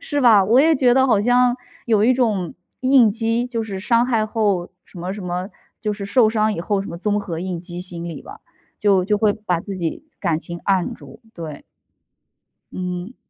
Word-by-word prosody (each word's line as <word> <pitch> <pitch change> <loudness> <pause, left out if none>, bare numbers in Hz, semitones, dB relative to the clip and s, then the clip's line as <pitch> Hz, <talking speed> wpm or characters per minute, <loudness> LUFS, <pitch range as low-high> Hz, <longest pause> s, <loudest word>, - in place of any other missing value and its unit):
是 295 -13 -2
吧， 215 -5 +7
我 230 +6 +4
也 320 +2 +4
觉 250 -3 +3
得 265 0 +4
好 215 -5 +3
像 245 +2 +3 0.3
有 220 -3 +2
一 255 +3 +4
种 210 -9 0 0.3
应 255 -4 +5
激， 230 +2 0
就 230 -2 -3
是 200 -3 -5
伤 235 +4 +2
害 225 -4 +1
后 205 -5 -1 0.2
什 175 - -13
么 180 +2 -4
什 200 -1 -7
么 180 +2 -3 0.3
就 210 -2 -1
是 200 -1 -6
受 220 +2 +4
伤 215 -1 +1
以 - - -4
后 200 +2 -1
什 - - -8
么 170 - -6
综 205 +3 0
合 170 -5 -5
应 180 -2 -4
激 175 0 -7
心 175 -2 -6
理 165 - -7
吧， 405 +3 -11 0.4
就 195 -4 +3
就 210 +1 +1
会 210 -1 +3
把 205 -6 -2
自 195 +1 -7
己 170 - -4 0.2
感 170 -5 0
情 170 +1 -7
按 190 -3 +1
住， 140 - -14
对。 155 -4 -8 1.1
嗯。 180 +5 -5
205 Hz, 220 characters per minute, -21 LUFS, 180-235 Hz, 1.1 s, 吧